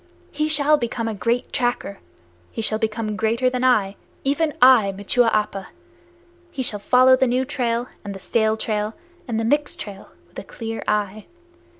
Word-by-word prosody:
He 305 0 -1
shall 300 0 +3
become 235 -2 -3
a 225 - -2
great 235 +4 -2
tracker. 240 -6 -2 0.5
He - - -8
shall 215 0 0
become 215 -1 -2
greater 230 +4 0
than 250 0 -2
I, 205 -6 +2 0.3
even 295 +3 0
I, 250 -6 +6
Machua 230 +4 +2
Appa! 205 -2 -1 0.8
He 275 -6 -4
shall 210 -4 +4
follow 255 +4 +5
the 260 0 +1
new 250 +2 0
trail, 245 -3 -2 0.2
and 200 -1 -6
the - - -8
stale 220 +2 0
trail, 215 0 -2 0.3
and 225 -2 -2
the 225 - -1
mixed 290 +5 0
trail, 200 -1 -8 0.2
with - - -10
a - - -8
clear 225 -2 -6
eye! 210 0 -2
230 Hz, 175 wpm, -22 LUFS, 215-255 Hz, 0.8 s, I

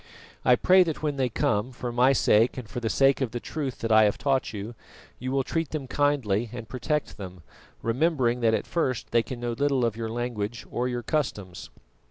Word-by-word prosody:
I 125 - +6
pray 185 +9 +5
that 160 -3 -1
when 145 -2 -1
they 130 -2 +1
come, 110 +1 0
for 125 -1 -5
my 125 +3 +4
sake 115 -2 +3
and 125 -4 -6
for 115 - -5
the 115 -2 -2
sake 135 +3 +3
of 130 - 0
the 120 - -4
truth 140 -1 -4
that 115 - -1
I 110 0 +7
have 105 - +1
taught 135 -2 0
you, 105 +2 -6 0.5
you 130 +1 -4
will 135 0 +1
treat 165 +1 -2
them 155 -4 -4
kindly 125 -7 +1
and 120 -2 -7
protect 150 +6 -2
them, 95 -4 -9 0.4
remembering 125 -1 +1
that 115 -2 +3
at - - -3
first 130 -8 -2
they 115 - +4
can 120 +2 -7
know 120 0 -2
little 135 +1 +1
of 115 -2 -1
your 115 0 -4
language 115 -2 -3
or 125 +1 -1
your 120 -1 -3
customs." 105 - -3
120 Hz, 215 wpm, -26 LUFS, 115-135 Hz, 0.5 s, I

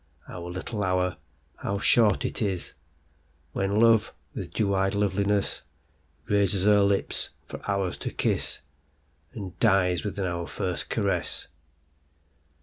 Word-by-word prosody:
Our 90 -1 -7
little 100 +4 -3
hour,—how 90 -2 -2
short 105 +1 +4
it - - -3
isWhen 75 0 -4
Love 115 -2 +5 0.2
with - - -5
dew 100 -2 +1
eyed 95 0 +2
lovelinessRaises 100 -1 -1
her 105 -1 +6
lips 100 0 +1 0.2
for - - -8
ours 100 -3 0
to - - -3
kissAnd 75 +6 -5
dies 95 -5 +3
within 100 -2 -2
our 85 -1 -2
first 90 -4 -3
caress. - - -1
95 Hz, 105 wpm, -27 LUFS, 85-100 Hz, 0.2 s, her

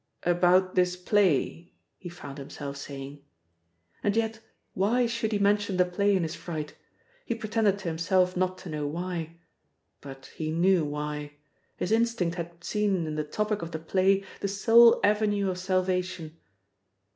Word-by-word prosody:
"About 180 +1 +3
this 180 0 +2
play," 180 -3 +1 0.3
he 175 - -8
found 145 -5 -9
himself 140 0 -7
saying. 140 0 -8 0.8
And 205 0 +1
yet 225 0 0 0.3
why 225 +6 +2
should 230 -1 -2
he 210 - +1
mention 205 -1 +1
the 180 - +4
play 200 +3 +1
in 185 - +1
his 160 0 -3
fright? 155 -5 -6 0.5
He 235 - -2
pretended 215 -2 +1
to 195 -3 -7
himself 180 +3 +1
not 185 0 0
to 185 - -10
know 150 -2 -3
why. 170 +1 -4 0.6
But 135 -1 -11
he 155 -1 -3
knew 175 +2 +3
why. 150 0 -4 0.4
His 180 - -2
instinct 225 -6 +1
had 170 0 -7
seen 200 -5 0
in 155 - -4
the 155 0 -1
topic 210 +7 -2
of 170 - -5
the 160 - -4
play 190 +4 +2 0.2
the - - -1
sole 230 +4 +6
avenue 205 -2 +2
of 180 - -5
salvation. 185 -3 -1
180 Hz, 155 wpm, -27 LUFS, 160-205 Hz, 0.8 s, sole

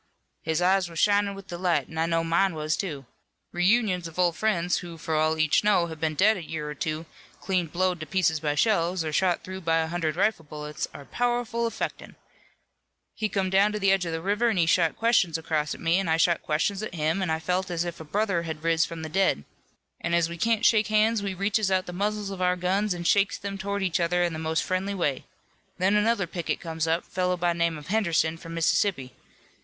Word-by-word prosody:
"His 160 +2 -1
eyes 185 -1 +3
were 165 - -12
shinin' 205 +3 +2
with 195 -1 -10
delight 175 0 0
an' 160 - -7
I 165 - +2
know 165 0 +1
mine 170 +2 +1
was, 155 0 -1
too. 145 -8 -4 0.5
Reunions 180 -1 +2
of 165 - -13
old 175 -2 +2
friends 180 -5 +1
who 170 -2 -9
for 160 0 -4
all 155 +1 +2
each 155 +3 +3
know 205 -4 +3
have 160 -2 -8
been 155 -1 -1
dead 210 +6 +4
a 180 - -6
year 155 -1 -5
or 150 - -4
two, 155 +2 -3 0.3
clean 185 -3 -1
blowed 180 +2 0
to 155 - -7
pieces 160 -2 +1
by 150 -1 -1
shells, 175 -1 +1
or 155 - -3
shot 180 +1 +1
through 190 0 -7
by 165 -1 +1
a 160 - +1
hundred 165 -3 -1
rifle 195 -1 +1
bullets 150 0 -5
are 140 - -11
powerful 240 - -1
affectin'. - - -5 1.0
He 215 - -2
come 190 -2 -1
down 200 +2 +4
to 210 - -2
the 195 -1 +3
edge 195 -1 +2
of - - -3
the 165 0 -4
river 210 +5 +1
an' 220 - 0
he 170 - +4
shot 160 - +2
questions 210 -8 +2
across 155 -2 -1
to - - -8
me, 170 +3 +1
an' 195 - -2
I 160 0 +2
shot 170 0 +2
questions 175 +6 -1
at 215 -5 -6
him, 160 +4 0
an' 185 - -1
I 160 - +1
felt 180 +3 -1
as 175 -1 -1
if 170 -1 -6
a - - -7
brother 195 +2 0
had 160 -2 -6
riz 165 -1 +3
from 165 -1 -7
the - - -4
dead. 175 - +1 0.6
An' 170 - 0
as 170 -1 +2
we 170 - -6
can't 230 +3 +1
shake 215 -2 +4
hands 215 0 +2
we 195 -2 -3
reaches 200 +2 +1
out 185 -1 +1
the 180 - -7
muzzles 205 +1 -2
of 190 -1 -6
our 180 0 +2
guns 185 +2 0
and 175 0 -6
shakes 200 +1 +3
them 200 0 -5
towards 200 0 -2
each 180 0 0
other 175 +1 +1
in 170 -1 0
the 155 - -5
most 160 0 0
friendly 190 +2 -2
way. 145 -8 -1 0.5
Then 190 +2 +2
another 210 -1 +2
picket 170 0 -3
comes 165 -1 -3
up, 165 +2 0
fellow 180 0 -1
by 175 0 +1
name 170 -1 0
of 150 +3 -11
Henderson, 170 -6 +1
from 165 0 -9
Mississippi. 165 -4 +1
175 Hz, 235 wpm, -26 LUFS, 160-195 Hz, 1.0 s, dead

